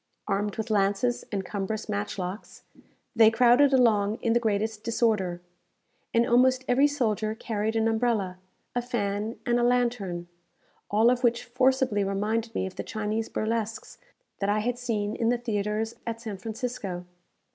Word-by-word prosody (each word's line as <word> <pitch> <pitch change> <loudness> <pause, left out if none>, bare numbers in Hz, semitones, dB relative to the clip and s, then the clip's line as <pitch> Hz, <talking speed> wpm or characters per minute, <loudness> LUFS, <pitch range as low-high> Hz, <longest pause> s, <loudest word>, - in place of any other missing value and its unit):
Armed 205 +1 -1
with 220 0 -3
lances 205 +4 +1
and 195 -3 -2
cumbrous 205 +3 -3
matchlocks, 205 -2 -4 0.5
they 225 -1 +7
crowded 245 +5 +5
along 220 -5 +3
in 230 - +2
the 240 - +4
greatest 220 -1 -1
disorder, 215 -6 0 0.7
and 230 +1 +3
almost 255 +2 +3
every 270 +4 +4
soldier 220 -6 -1
carried 220 -1 -2
an 225 0 +2
umbrella, 220 -5 0 0.3
a 245 - 0
fan, 215 -2 -2
and 240 0 +2
a - - +1
lantern; 235 -8 0 0.6
all 220 +4 +4
of 250 0 -1
which 235 -1 +2
forcibly 255 -3 +2
reminded 215 +4 -1
me - - 0
of 190 - -8
the - - -3
Chinese 215 +1 -3
burlesques 225 0 -3 0.4
that 200 - 0
I 205 - +2
had 245 +2 -2
seen 215 -4 -2
in 230 - +1
the 245 - +2
theatres 220 -1 -2
at 230 0 -3
San 215 -5 -6
Francisco. 215 -5 -4
220 Hz, 155 wpm, -27 LUFS, 205-240 Hz, 0.7 s, they